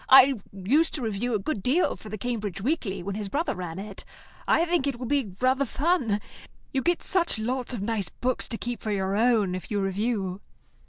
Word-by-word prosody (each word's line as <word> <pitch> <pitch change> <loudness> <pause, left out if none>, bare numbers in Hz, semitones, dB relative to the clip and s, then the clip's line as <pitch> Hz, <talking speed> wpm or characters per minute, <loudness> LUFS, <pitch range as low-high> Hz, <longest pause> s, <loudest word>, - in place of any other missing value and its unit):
I 270 +1 +9 0.2
used 245 - +2
to 275 - -3
review 225 +2 -1
a - - +1
good 210 0 -2
deal 275 - +2
for 215 - -11
the 215 - -4
Cambridge 210 -4 -3
Weekly 220 - -1
when 200 +2 -3
his 205 0 -4
brother 305 - 0
ran 175 -2 -5
it. 200 0 -7 0.4
I 335 - +4
think 340 -5 +1
it 275 -3 -1
will 250 - -5
be 245 -8 0
rather 260 +2 +3
fun. 270 - +1 0.5
You 265 - +1
get 345 +4 +1
such 355 -8 +2
lots 250 +4 -2
of 200 - -4
nice 205 -5 -1
books 255 0 -1
to 230 - -4
keep 240 +1 -4
for 220 - -3
your 195 -1 0
own 220 -4 +3
if 185 - -5
you 205 - 0
review." 195 -1 -1
230 Hz, 210 wpm, -27 LUFS, 200-265 Hz, 0.5 s, I